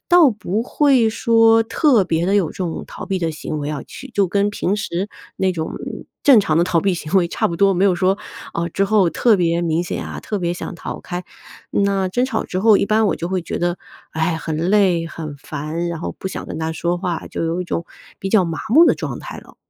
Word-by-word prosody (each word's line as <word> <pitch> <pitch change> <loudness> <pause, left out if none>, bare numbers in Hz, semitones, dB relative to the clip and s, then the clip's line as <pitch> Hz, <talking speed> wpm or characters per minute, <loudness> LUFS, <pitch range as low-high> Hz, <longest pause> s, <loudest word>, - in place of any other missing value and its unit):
倒 350 -5 +7
不 215 0 -2
会 260 -4 +3
说 225 0 +4
特 235 - +3
别 170 0 0
地 195 - +2
有 190 -6 +3
这 - - -11
种 175 -3 -3
逃 - - -8
避 190 -2 -1
的 165 -2 -1
行 155 0 -5
为 145 - -4
要 150 -2 -4
去 270 0 -11
就 200 -2 +2
跟 200 +2 +1
平 205 0 -1
时 190 0 -3 0.3
那 190 -1 +1
种 160 -2 -4 0.5
正 275 -5 +7
常 160 -6 +2
的 170 - +4
逃 175 -2 +1
避 195 -1 +1
行 155 -3 -5
为 180 -3 +4
差 - - 0
不 170 - -4
多， 200 +1 +4
没 190 +2 +2
有 185 - +3
说， 185 +3 +1 0.3
啊， 170 0 -2
之 195 +4 0
后 200 -3 +3
特 220 +3 +3
别 170 0 +1
明 165 0 +1
显 - - -4
啊， - - -6
特 210 - -3
别 175 -2 -1
想 175 - -6
逃 - - -6
开。 180 0 -5 0.5
那 200 -1 +1
争 245 +5 +1
吵 260 - -2
之 185 - -3
后， 220 -1 +6
一 - - +1
般 215 +1 +2
我 - - 0
就 170 - -4
会 185 -1 -1
觉 - - -5
得， 175 0 -1 0.3
哎， 160 +1 0
很 160 -1 -4 0.2
累、 185 -5 +3
很 155 -3 -7
烦， 155 +4 -4
然 170 -2 -4
后 - - -5
不 190 - -4
想 - - -6
跟 - - -6
他 160 0 -2
说 170 +2 -1
话， 175 -3 -3
就 - - -4
有 170 +2 -1
一 - - -9
种 170 -1 -3 0.3
比 195 - -4
较 195 -2 +4
麻 165 -2 -3
木 310 +9 +7
的 - - +4
状 - - -5
态 - - -8
了。 - - -15
185 Hz, 260 characters per minute, -20 LUFS, 170-205 Hz, 0.5 s, 倒